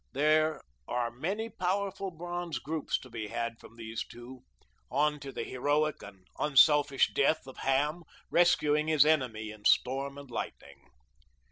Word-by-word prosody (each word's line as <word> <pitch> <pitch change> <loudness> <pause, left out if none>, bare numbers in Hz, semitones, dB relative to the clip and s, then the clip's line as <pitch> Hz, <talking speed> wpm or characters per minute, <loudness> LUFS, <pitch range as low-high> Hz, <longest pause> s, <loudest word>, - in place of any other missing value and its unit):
There 155 +2 +2 0.2
are 120 -1 -1
many 190 - -3
powerful 195 -1 -2
bronze 175 0 -5
groups 155 +1 -2
to 130 - -12
be 110 -2 -5
had 115 +2 -4
from 115 - -15
these 115 -1 -5
two, 120 +2 -12 0.5
on 150 +1 +1
to 140 -1 -7
the - - -4
heroic 145 +4 0
and 95 -2 -13
unselfish 145 -1 +4
death 140 +3 +2
of 130 - -11
Ham, 150 +5 0 0.3
rescuing 150 -3 +3
his 155 -2 +5
enemy 125 -9 +1
in 105 -1 -13
storm 135 +2 +2
and 140 -3 -11
lightning. 70 -10 -7
145 Hz, 145 wpm, -30 LUFS, 120-155 Hz, 0.5 s, his